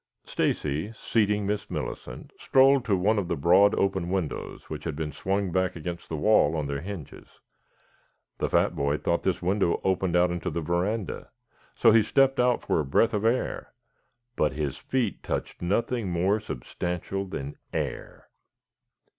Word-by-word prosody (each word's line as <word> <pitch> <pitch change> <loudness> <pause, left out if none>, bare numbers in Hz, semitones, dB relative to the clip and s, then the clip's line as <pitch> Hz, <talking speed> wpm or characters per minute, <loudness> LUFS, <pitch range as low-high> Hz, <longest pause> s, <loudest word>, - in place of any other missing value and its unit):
Stacy, 75 +8 -1
seating 105 -2 0
Miss 105 +1 -2
Millicent, - - -6
strolled 135 0 +4
to 100 -4 +2
one 105 +4 +2
of 95 - -3
the - - -1
broad, 90 +7 +5
open 95 -3 0
windows 90 -5 -3
which 75 -1 -6
had 80 -3 -3
been 75 0 -3
swung 95 +5 -1
back 95 0 0
against 85 +1 -6
the 80 - -3
wall 80 -4 +4
on 75 -2 -1
their 70 0 -3
hinges. 90 -5 -9 1.0
The - - 0
fat - - +2
boy 70 +1 0
thought 85 +3 0
this 95 -2 -1
window 95 -1 +1
opened 95 -2 +1
out 90 0 +4
on 85 - -2
the 85 - -3
veranda, 90 +6 -2 0.5
so 115 - +5
he 115 +1 +6
stepped 135 +4 +3
out 125 -1 +2
for - - +1
a - - +1
breath 70 +12 +2
of 105 0 -1
air, 115 +3 -1 0.6
but 75 -3 +1
his 75 -2 -2
feet 125 -6 -1
touched - - -4
nothing 110 +4 0
more 95 +5 +1
substantial 90 - -4
than 70 -6 -6
air. - - -5
95 Hz, 165 wpm, -27 LUFS, 80-105 Hz, 1.0 s, he